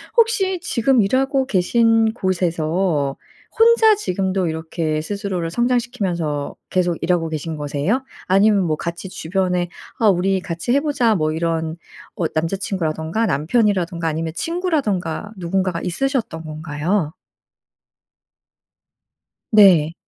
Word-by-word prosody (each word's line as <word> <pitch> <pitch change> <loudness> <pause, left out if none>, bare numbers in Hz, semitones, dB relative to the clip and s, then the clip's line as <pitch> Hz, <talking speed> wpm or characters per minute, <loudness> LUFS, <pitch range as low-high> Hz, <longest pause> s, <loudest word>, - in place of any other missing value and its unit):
혹시 390 -6 +2
지금 255 -5 +2
일하고 265 +6 +1
계신 225 +2 +3
곳에서 170 - 0 0.4
혼자 450 -1 +6
지금도 190 - -1
이렇게 160 -1 -2
스스로를 190 -2 -3
성장시키면서 200 - -1 0.2
계속 180 -3 +1
일하고 165 -1 +1
계신 160 +1 -4
거세요? 150 - -1 0.2
아니면 195 +1 +4
뭐 160 -3 0
같이 170 +4 -5
주변에 180 0 -1 0.3
"아 225 - +3
우리 190 +1 +2
같이 170 +6 -3
해 275 - +4
보자." 270 -7 +2
뭐 155 -5 0
이런 165 0 -2 0.4
어 170 - 0
남자 165 +4 -1
친구라든가 170 +2 -2
남편이라든가 170 - +1
아니면 160 0 -2
친구라든가 220 - -2
누군가가 185 -1 -1
있으셨던 220 - -2
건가요? 155 +2 -2 2.4
네. 180 -7 +6
185 Hz, 280 characters per minute, -20 LUFS, 160-225 Hz, 2.4 s, 혼자